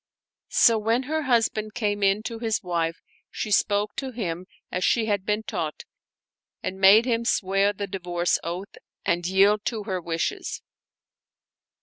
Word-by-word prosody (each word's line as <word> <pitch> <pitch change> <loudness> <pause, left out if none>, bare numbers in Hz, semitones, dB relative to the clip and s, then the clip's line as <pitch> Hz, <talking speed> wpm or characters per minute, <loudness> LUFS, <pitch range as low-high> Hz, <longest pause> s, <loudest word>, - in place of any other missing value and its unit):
So 230 -2 +5
when 225 +4 +1
her 315 +4 -1
husband 220 -4 +1
came 205 -2 -1
in 200 +2 +2
to 230 0 -5
his 225 -3 -1
wife, 165 -2 -2 0.3
she 215 - -4
spoke 205 +1 +2
to 270 - -3
him 185 -7 -4 0.2
as 180 - -2
she 230 -2 +2
had 205 -3 -1
been 210 +1 0
taught 170 -9 -4 0.8
and 190 +1 -4
made 205 +4 +7
him 235 -2 0
swear 195 -2 +2
the 205 0 -4
divorce 180 -2 -1
oath 180 +4 -6 0.3
and 175 0 0
yield 200 +3 +4
to 220 -3 -2
her 190 -3 -3
wishes. 165 -1 -3
205 Hz, 150 wpm, -25 LUFS, 185-220 Hz, 0.8 s, made